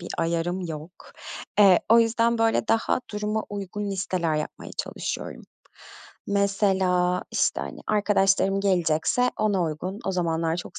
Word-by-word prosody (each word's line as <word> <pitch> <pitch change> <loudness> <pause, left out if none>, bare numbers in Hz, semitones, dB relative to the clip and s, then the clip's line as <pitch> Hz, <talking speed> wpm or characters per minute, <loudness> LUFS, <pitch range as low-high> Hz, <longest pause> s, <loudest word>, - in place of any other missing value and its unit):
bir 175 - -8
ayarım 170 +2 -1
yok. 160 -1 -6 0.7
Eee, 195 -3 +7
o 230 +1 +7
yüzden, 230 0 +2
böyle, 225 0 +1
daha 225 +2 +1
duruma 210 +1 -2
uygun 205 0 -4
listeler 180 -4 -1
yapmaya 150 - -5
çalışıyorum. - - -4 0.9
Mesela, 190 -3 +1
işte, - - +1
hani, - - -7
arkadaşlarım 195 -2 +2
gelecekse 185 +5 +1
ona 205 -4 +1
uygun, 170 +5 -4
o 195 - 0
zamanlar 165 -2 0
çok 175 - -7
190 Hz, 130 wpm, -25 LUFS, 175-210 Hz, 0.9 s, Eee